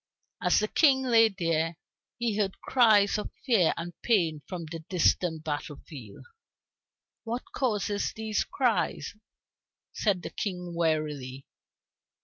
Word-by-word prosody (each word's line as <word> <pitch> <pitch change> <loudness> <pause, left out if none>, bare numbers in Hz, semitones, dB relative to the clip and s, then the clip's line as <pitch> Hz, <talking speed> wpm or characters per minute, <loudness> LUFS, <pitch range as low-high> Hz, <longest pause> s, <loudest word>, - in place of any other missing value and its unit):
As - - +3
the 215 - 0
King 265 +1 +4
lay 230 -3 +5
there, 165 -4 -1 0.4
he 235 -3 -1
heard 200 -2 -1
cries 215 -5 +4
of - - -5 0.2
fear 220 - +4
and 175 +1 -5
pain 170 -10 +1
from 175 -3 -5
the 165 +1 -7
distant 170 -2 +1
battle 150 0 -4
field. 125 -10 -11 1.0
"What 240 +2 -3
causes 210 -5 -1
these 220 -1 -1
cries?" 210 - -1 0.8
said 195 -4 0
the - - -6
King 180 -3 -4
wearily. 150 -5 -2
185 Hz, 125 wpm, -28 LUFS, 160-220 Hz, 1.0 s, lay